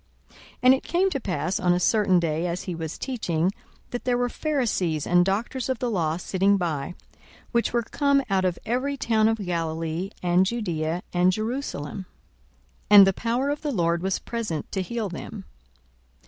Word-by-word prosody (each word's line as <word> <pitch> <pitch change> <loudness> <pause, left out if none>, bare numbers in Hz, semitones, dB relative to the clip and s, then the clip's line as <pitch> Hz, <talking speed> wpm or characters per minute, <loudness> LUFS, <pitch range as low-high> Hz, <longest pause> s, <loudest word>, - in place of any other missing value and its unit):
42:005:017 - - -21 0.2
And 255 +1 +8
it 265 - -1
came 370 +3 +1
to 275 - -1
pass 180 - -2
on 180 -1 +3
a 175 - +1
certain 195 -1 +3
day, 165 0 -1
as 175 +1 -3
he 180 - -4
was 165 -1 -5
teaching, 185 - -1 0.4
that 245 - -4
there 250 -1 +1
were 245 0 0
Pharisees 225 - -1
and 175 0 +4
doctors 225 +7 -2
of 260 - 0
the 245 -1 -2
law 165 -5 0
sitting 195 +2 +2
by, 165 -2 -3 0.6
which 235 -1 +1
were 235 -1 +1
come 280 +3 +2
out 195 -2 +1
of 180 -2 0
every 255 +5 -1
town 220 -4 +2
of 225 0 +1
Galilee, 165 -1 -2
and 175 +1 +4
Judaea, 175 -7 -2
and 180 +1 +4
Jerusalem: 215 - -4 0.8
and 205 -1 +10
the 195 - +2
power 240 +7 -1
of 290 - -3
the 295 - -2
Lord 170 -6 +1
was 190 0 0
present 215 -10 -4
to 190 - -1
heal 225 +3 -3
them. 190 +3 -8
195 Hz, 180 wpm, -25 LUFS, 175-240 Hz, 0.8 s, and